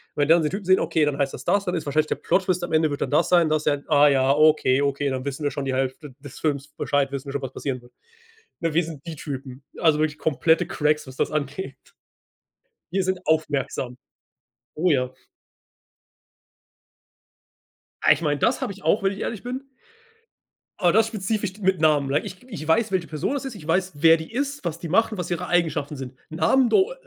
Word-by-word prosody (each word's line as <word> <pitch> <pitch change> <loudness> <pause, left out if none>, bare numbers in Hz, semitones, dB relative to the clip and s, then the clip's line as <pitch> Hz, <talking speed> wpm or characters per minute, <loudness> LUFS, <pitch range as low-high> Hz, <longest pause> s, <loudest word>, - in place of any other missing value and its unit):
Wenn 145 -1 +1
wir 165 - +8
dann 170 - +2
den 150 - 0
Typen 195 +1 -5
sehen, 185 +1 +5
okay, 155 -2 +1
dann 145 -1 -1
heißt 140 -1 0
das 130 - -8
das 200 +5 +1
dann 180 - -1
ist 160 -4 -3
wahrscheinlich 155 +2 +2
der - - -1
Plot-Twist 185 -2 0
am 175 - -4
Ende 155 -1 +2
wird 145 - -4
dann - - -1
das 145 - +2
sein“ 175 -3 +4
das 155 0 0
ja. 145 -1 +2
Ah 145 -1 +5
ja, 135 -1 +3
okay, 150 -3 +4
okay, 140 0 0
dann 130 0 -3
wissen 140 +2 -4
wir 145 - +2
schon 140 - -4
die 135 - -1
Hälfte 130 +2 -3
des 140 -2 -11
Films 145 -2 -1
Bescheid 140 -2 -1
wissen 140 -1 -5
wir - - -4
schon, 140 - -2
was 130 -2 -5
passieren 130 -2 -4
wird. 120 - -19 0.7
Ne, 165 -2 -1
wir 170 - +4
sind 155 -3 -8
die 165 - -5
Typen, 135 -2 -7 0.2
also 160 -3 +4
wirklich 155 -1 -1
komplette 160 +2 +2
Cracks, 150 0 0
was 130 - -10
das - - -1
angeht. 150 +1 -3 1.1
Wir 190 +3 0
sind 185 0 -1
aufmerksam. 145 -5 -1 0.8
Oh 175 +4 +1
ja. 130 -4 +1 2.9
Ah, - - +6
ich - - 0
meine, 145 -2 0
das - - +1
habe - - -2
ich 200 - -15
auch, 210 - +2
wenn 195 0 +2
ich 195 - -8
ehrlich 215 -4 -4
bin 255 +3 -6 1.1
aber 175 -1 +3
das 220 0 +4
spezifisch 210 -2 -3
mit 190 -3 +1
Namen, 150 -3 +3
like 145 +2 +1
ich - - -7
ich 155 - -7
weiß, 220 +7 +2
welche 185 -3 0
Person 155 - -2
das 280 - -3
ist. 265 -3 -5
Ich 185 -7 -11
weiß, 185 +3 +1
wer 165 +2 +6
die 160 +5 -9
ist, 280 +3 -3
was 165 -1 -3
die 170 - -6
macht 225 +6 +2
und 215 - -5
was 180 - -4
ihre 175 +1 -2
Eigenschaften 160 -5 0
sind. 130 -2 -7 0.2
Namen 175 +11 +3
do 410 - +3
155 Hz, 220 wpm, -24 LUFS, 140-185 Hz, 2.9 s, wir